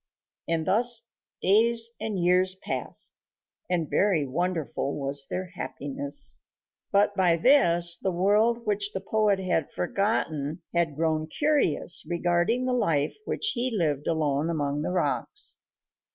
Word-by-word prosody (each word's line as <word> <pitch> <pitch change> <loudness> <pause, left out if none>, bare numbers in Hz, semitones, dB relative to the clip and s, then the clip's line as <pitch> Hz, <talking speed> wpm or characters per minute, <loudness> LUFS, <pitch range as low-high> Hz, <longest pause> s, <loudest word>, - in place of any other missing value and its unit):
And 165 -1 -1
thus 230 +4 +3 0.4
days 230 +3 +4
and 215 -3 -3
years 180 +1 +2
passed, 190 - -3 0.5
and 170 -3 -1
very 185 -6 +1
wonderful 155 -2 -3
was 140 0 +1
their 185 0 -5
happiness. 280 +8 -2 0.5
But 205 +1 +3
by 180 -4 +2
this 175 - +5
the 190 - -1
world 210 +6 +1
which 205 -1 -1
the - - -3
poet 205 +1 +1
had 180 -5 -1
forgotten 155 - -2
had 170 -4 0
grown 155 0 -1
curious 285 - +1
regarding 175 +8 0
the 255 - 0
life 155 -11 0
which 445 - 0
he 250 +1 -1
lived 150 -5 -1
alone 155 -1 0
among 145 -3 -2
the 155 - -3
rocks. 185 - -1
180 Hz, 130 wpm, -26 LUFS, 160-215 Hz, 0.5 s, this